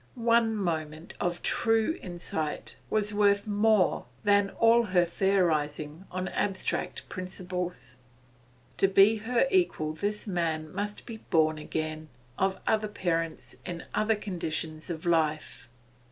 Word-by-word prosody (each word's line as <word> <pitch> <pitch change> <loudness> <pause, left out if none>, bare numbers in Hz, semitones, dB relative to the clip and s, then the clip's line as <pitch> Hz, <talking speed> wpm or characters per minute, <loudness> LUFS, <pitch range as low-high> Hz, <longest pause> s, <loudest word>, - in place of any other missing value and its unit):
One 230 -2 +3
moment 160 -4 -3
of 175 0 -2
true 225 +6 +2
insight 170 -4 -3
was 210 -1 +1
worth 200 -1 +3
more 210 -2 +2 0.2
than 205 -1 +4
all 230 +3 +4
her 180 -3 +3
theorising 165 -4 0
on 185 0 -3
abstract 195 -2 -2
principles. 180 -8 -5 0.8
To 195 - +4
be 195 +3 +5
her 230 +4 +1
equal 245 - +1
this 205 +6 -2
man 165 -5 -2
must 205 +2 -4
be 230 - -7
born 155 -1 +3
again, 155 0 -4 0.3
of 190 0 +1
other 215 -1 +1
parents, 165 -5 -2
in 175 -2 -6
other 215 +1 +2
conditions 160 -6 -3
of 165 -1 -5
life. 155 -6 0
185 Hz, 125 wpm, -28 LUFS, 160-210 Hz, 0.8 s, be